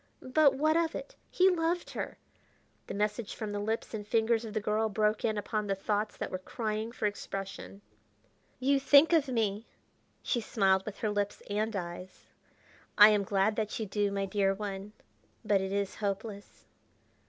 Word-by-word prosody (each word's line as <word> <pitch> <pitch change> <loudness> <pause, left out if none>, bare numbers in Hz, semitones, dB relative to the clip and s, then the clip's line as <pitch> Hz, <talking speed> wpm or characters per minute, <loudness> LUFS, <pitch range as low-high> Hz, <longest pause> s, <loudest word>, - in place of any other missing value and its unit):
but 310 -2 +5
what 310 +3 +2
of 335 -1 +1
it? - - -7
he 370 - +4
loved 345 -1 0
her!... - - -5 0.7
The - - -5
message 210 +1 -2
from 215 -2 -4
the 205 - -3
lips 220 +3 -3
and 210 -2 -5
fingers 225 +1 +2
of 215 -1 -8
the - - +2
girl 215 +1 0
broke 210 +1 +1
in 215 -2 0
upon 210 0 -2
the 195 - 0
thoughts 210 +2 -2
that - - -4
were 185 - -3
crying 215 +3 -3
for 230 - -3
expression. 195 -1 -5 0.8
"You 275 +2 +3
think 285 +4 +6
of 310 -4 +4
me." 220 -4 -1 0.6
She 240 - 0
smiled 195 -3 +2
with 210 - -5
her 215 - 0
lips 205 0 -2
and 215 +1 -1
eyes. 180 0 -7 0.7
"I 210 +1 +10
am 210 -1 +3
glad 200 +2 +1
that 215 0 -2
you 220 - -2
do, 205 0 0
my 200 0 -1
dear 195 0 +1
one, 200 0 -6 0.5
but 205 -2 +3
it 190 0 -3
is 200 -1 -1
hopeless. 200 0 -5
210 Hz, 175 wpm, -30 LUFS, 200-225 Hz, 0.8 s, I